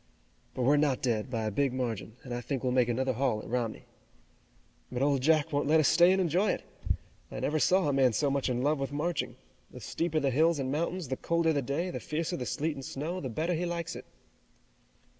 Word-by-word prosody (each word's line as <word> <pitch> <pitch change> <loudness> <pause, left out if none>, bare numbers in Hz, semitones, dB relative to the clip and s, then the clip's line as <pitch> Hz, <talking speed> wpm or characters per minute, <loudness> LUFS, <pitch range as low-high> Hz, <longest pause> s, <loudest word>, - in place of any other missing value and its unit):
"But 130 - -1
we're 145 +4 +4
not 145 -4 +1
dead, 115 -2 0
by 115 -3 -2
a 110 - -1
big 135 +4 +1
margin, 115 -4 -3
and 125 - -6
I 120 - -3
think 135 +1 -3
we'll 130 - +1
make 125 -1 +3
another 130 +2 0
haul 125 -3 0
at - - -9
Romney." 115 -2 -2 1.1
"But 125 +2 -1
Old 140 -2 +2
Jack 155 +2 +3
won't 145 0 +1
let 160 +2 +5
us 155 - +4
stay 175 +1 +6
and 190 - +3
enjoy 185 +3 +2
it. - - -6 0.7
I - - -5
never 155 +1 0
saw 185 +2 +3
a 145 - +1
man 135 -2 +4
so 140 +6 +1
much 140 -1 0
in 125 0 -1
love 150 +1 +2
with 135 -1 -3
marching. 155 +4 -2 0.3
The - - -11
steeper 165 -2 -1
the 140 -3 +1
hills 160 +5 +3
and 135 -2 -2
mountains, 170 +1 -2
the 130 - -2
colder 170 -1 +1
the 145 - +1
day, 145 +8 -2
the - - -4
fiercer 155 +1 -2
the 125 - -4
sleet 155 +10 -1
and 135 -2 -8
snow, 160 +8 -4
the 130 - -4
better 160 +9 -1
he 175 +1 -1
likes 170 -1 -3
it." - - -8
140 Hz, 235 wpm, -30 LUFS, 130-160 Hz, 1.1 s, stay